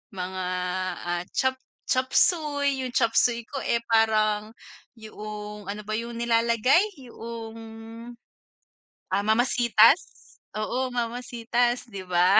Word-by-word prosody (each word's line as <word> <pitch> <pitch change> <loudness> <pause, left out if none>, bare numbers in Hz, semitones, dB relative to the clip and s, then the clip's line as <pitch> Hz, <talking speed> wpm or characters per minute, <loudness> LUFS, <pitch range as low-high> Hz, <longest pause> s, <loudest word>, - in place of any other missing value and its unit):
Mga, 185 0 -4 0.6
ah, 175 0 -1
chop 260 0 0 0.3
chop 255 0 +1
suey. 285 -5 +2
'Yung 255 - -3
chop 230 -2 +1
suey 235 -1 +2
ko, 275 - -5
eh 235 0 0
parang, 215 -1 +2 0.5
yoong, 210 -2 -8
ano 210 +1 -5
ba 215 - -4
'yung 235 +1 -5
nilalagay, 235 - +3 0.3
yoong, 230 -1 -8 1.5
ah, 200 - +2
Mama 220 +3 +4
Sita's, 240 +5 +3 0.2
oo 255 +4 -1
Mama 240 0 -2
Sita's, 240 +1 0
'di 200 -3 -7
ba. 180 +3 +5
230 Hz, 120 wpm, -26 LUFS, 210-245 Hz, 1.5 s, ba